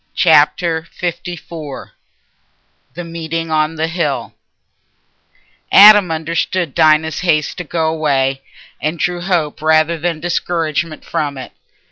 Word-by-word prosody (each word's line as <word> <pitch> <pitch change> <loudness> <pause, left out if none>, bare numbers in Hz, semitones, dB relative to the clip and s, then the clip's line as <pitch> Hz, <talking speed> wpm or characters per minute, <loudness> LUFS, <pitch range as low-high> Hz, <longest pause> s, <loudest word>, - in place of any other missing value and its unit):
Chapter 160 +1 +2
LIV 170 -4 -6 1.0
The 175 - -6
Meeting 165 -1 -5
on 155 +1 0
the 160 +1 -1
Hill 165 -5 -3 1.4
Adam 205 -2 +8
understood 165 0 -2
Dinah's 160 -1 +2
haste 155 -4 0
to - - -3
go 160 0 -2
away, 135 -4 0 0.4
and 155 +3 -2
drew 175 +2 -2
hope 175 -6 -2
rather 160 +1 +2
than 165 -1 -2
discouragement 165 -2 -2
from 145 -2 -3
it. 130 - -8
160 Hz, 110 wpm, -16 LUFS, 155-170 Hz, 1.4 s, Adam